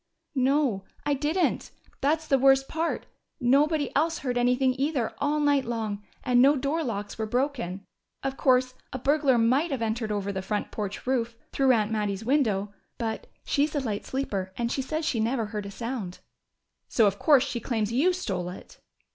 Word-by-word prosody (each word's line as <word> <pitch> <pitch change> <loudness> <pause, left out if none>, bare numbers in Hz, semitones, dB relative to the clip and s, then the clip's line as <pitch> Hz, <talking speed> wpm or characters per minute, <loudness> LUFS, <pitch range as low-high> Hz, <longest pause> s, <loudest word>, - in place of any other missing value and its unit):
"No, 265 -6 +2 0.2
I 290 - +2
didn't. 305 +6 0 0.3
That's 310 +3 +1
the 275 -3 +3
worst 270 0 +5
part. 325 +1 -2 0.3
Nobody 285 +3 +2
else 325 +3 +2
heard 250 -2 -2
anything, 250 +2 +3
either, 275 -5 0
all 290 +2 +1
night 290 -2 +3
long, 220 -4 -3 0.2
and 245 -1 +4
no 280 +3 +6
door 285 +4 -1
locks 205 -5 -4
were 220 - -1
broken. 240 -7 -2 0.4
Of 270 0 -2
course, 255 -1 +3 0.2
a - - -3
burglar 275 0 +3
might 255 +9 +3
have 265 -5 -2
entered 220 0 -1
over 200 -1 -1
the 190 - -2
front 210 +2 -3
porch 205 -1 -5
roof, 240 -3 0 0.2
through 270 -2 +4
Aunt 215 -2 +1
Mattie's 210 -1 -2
window. 215 -7 +1 0.2
But 225 -2 -3 0.2
she's 295 +2 +1
a - - +2
light 220 -7 -3
sleeper, 200 -9 -3
and 235 0 -1
she 270 - 0
says 310 +4 -3
she 245 -7 0
never 230 +1 0
heard 210 -1 -5
a - - -6
sound." 220 -4 -5 0.7
"So 225 - +3
of 200 0 +1
course 285 -4 +5
she 250 -4 -3
claims 225 -2 -1
you 305 +9 +4
stole 190 - -3
it!" 180 - -11
250 Hz, 180 wpm, -27 LUFS, 215-280 Hz, 0.7 s, no